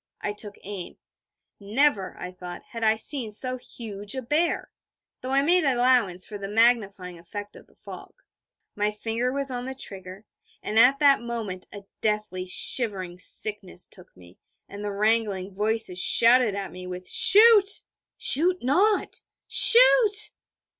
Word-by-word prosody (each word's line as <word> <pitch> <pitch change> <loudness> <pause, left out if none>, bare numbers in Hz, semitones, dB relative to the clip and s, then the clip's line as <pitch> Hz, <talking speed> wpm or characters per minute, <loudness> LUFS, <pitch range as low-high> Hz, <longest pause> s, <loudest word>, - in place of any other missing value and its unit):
I 205 - -4
took 205 -1 -8
aim. 195 -3 -8 0.6
Never, 210 0 0
I 180 - -7
thought, 180 -1 -10
had 230 -1 -7
I 220 0 +3
seen 245 0 -3
so 255 +4 -1
huge 210 -3 -6
a 260 - -4
bear 315 +7 -1 0.5
though 255 - -6
I 275 +1 +2
made 355 +4 +3
allowance 245 -8 +2
for 205 -2 -8
the 195 - -6
magnifying 200 -6 +1
effect 205 +4 -9
of - - -15
the - - -28
fog. - - -12 0.6
My 210 0 0
finger 225 +4 -3
was 275 0 -3
on 245 0 -5
the 265 0 -6
trigger: 190 -3 -9 0.4
and 215 +1 0
at 255 +4 +5
that 280 -3 +4
moment 225 -6 -6
a 205 -1 -10 0.2
deathly 210 -4 -2
shivering 185 -3 -1
sickness 190 -1 -4
took 180 - -16
me, 90 0 -18 0.3
the 205 +1 -7
wrangling 205 -2 -1
voices 210 -2 -2
shouted 235 -2 +4
at 200 -1 -5
me, 180 0 -9
with 180 0 -8
'Shoot!' 415 -1 +6 0.3
'Shoot 355 +4 +2
not!' 385 - +1 0.3
'Shoot!' 465 -3 +5
220 Hz, 145 wpm, -25 LUFS, 195-260 Hz, 0.6 s, Shoot